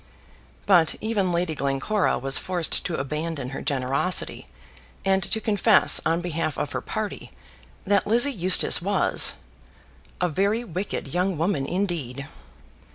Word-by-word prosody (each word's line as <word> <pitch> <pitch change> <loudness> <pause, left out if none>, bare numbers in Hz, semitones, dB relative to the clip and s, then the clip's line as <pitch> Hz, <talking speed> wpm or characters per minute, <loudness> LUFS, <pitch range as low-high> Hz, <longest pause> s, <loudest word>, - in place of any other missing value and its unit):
But 175 -5 +4
even 210 -4 -1
Lady 170 -1 -1
Glencora 140 +9 0
was 135 +1 +1
forced 180 -3 -1
to 170 - -2
abandon 150 -1 -4
her 135 - -6
generosity, 140 +6 0 0.6
and 190 0 +2
to 220 - -1
confess, 215 -1 +4
on 165 +1 0
behalf 165 -4 -3
of - - -3
her - - -3
party, - - -5 0.5
that 200 0 +1
Lizzie 240 +6 +3
Eustace 185 -3 +2
was 200 +3 +2 0.8
a 180 - +1
very 200 +8 0
wicked 185 - -5
young 180 0 0
woman, 160 -4 -1
indeed. 155 -8 -3
175 Hz, 130 wpm, -24 LUFS, 150-200 Hz, 0.8 s, But